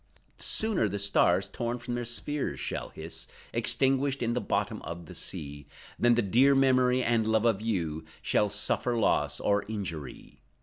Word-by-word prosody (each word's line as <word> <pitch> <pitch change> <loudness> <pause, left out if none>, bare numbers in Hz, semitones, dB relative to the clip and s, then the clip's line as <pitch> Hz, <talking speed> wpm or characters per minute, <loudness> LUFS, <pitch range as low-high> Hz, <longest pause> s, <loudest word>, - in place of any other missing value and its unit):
Sooner 215 - +1
the 100 - -3
stars, 100 -2 +3
torn 120 0 -3
from 120 0 -6
their 120 0 -2
spheres, 140 +5 -3
shall - - -4
hiss, - - -7 0.3
Extinguished 135 0 +2
in 120 0 0
the 125 - -1
bottom - - -1
of 85 +1 -7
the - - -11
sea, 75 -5 -6 0.3
Than 120 0 +4
the 120 - +2
dear 130 +8 +4
memory, 130 -1 +3
and 115 -2 +1
love 110 0 +2
of 110 -3 +2
you, 85 -8 -2 0.2
Shall 105 - +1
suffer 110 +4 +1
loss, 110 - +1
or 100 0 +1
injury. 85 - -6
115 Hz, 165 wpm, -29 LUFS, 100-125 Hz, 0.3 s, Than